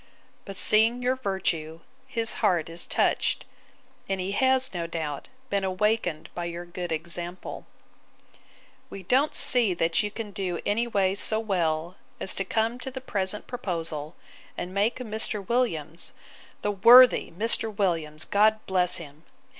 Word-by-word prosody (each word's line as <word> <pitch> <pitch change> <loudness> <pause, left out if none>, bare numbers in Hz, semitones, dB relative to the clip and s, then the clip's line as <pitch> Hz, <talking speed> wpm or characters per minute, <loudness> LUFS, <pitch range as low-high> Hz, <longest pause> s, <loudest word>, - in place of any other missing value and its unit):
But 195 -1 -8
seeing 225 +5 +3
your 255 +1 +2
virtue, 170 -8 -3 0.3
his 230 -3 0
heart 180 -6 +2
is 165 +1 -5
touched; - - +1 0.6
and 195 -1 -1
he 185 +1 -2
has, 260 +3 +2
no 170 -2 -3
doubt, 155 -4 -5 0.2
been 200 -1 +1
awakened 190 -3 0
by 175 - -4
your 170 0 -5
good 175 0 -6
example. 170 +2 -5 1.2
'We 195 - -9
don't 265 - +2
see 230 -7 +4
that 165 +2 +1
you 210 - -2
can 210 0 -7
do 185 -3 -3
any 230 +4 +1
way 195 -4 +1
so 215 +2 +2
well, 175 -5 -1 0.2
as 190 - -1
to 195 - -1
come 220 +3 0
into 245 +2 -7
the 260 0 -6
present 205 -5 -2
proposal, 165 -9 -4 0.4
and 180 +1 -5
make 205 +4 +1
Mr. 215 -4 -2
Williams, 170 - -1 0.5
the 205 - +1
worthy 235 +5 +7
Mr. 220 +4 +1
Williams! 165 -7 -1
God 215 +2 +3
bless 180 -2 +3
him! 155 -1 -12
195 Hz, 145 wpm, -26 LUFS, 170-225 Hz, 1.2 s, worthy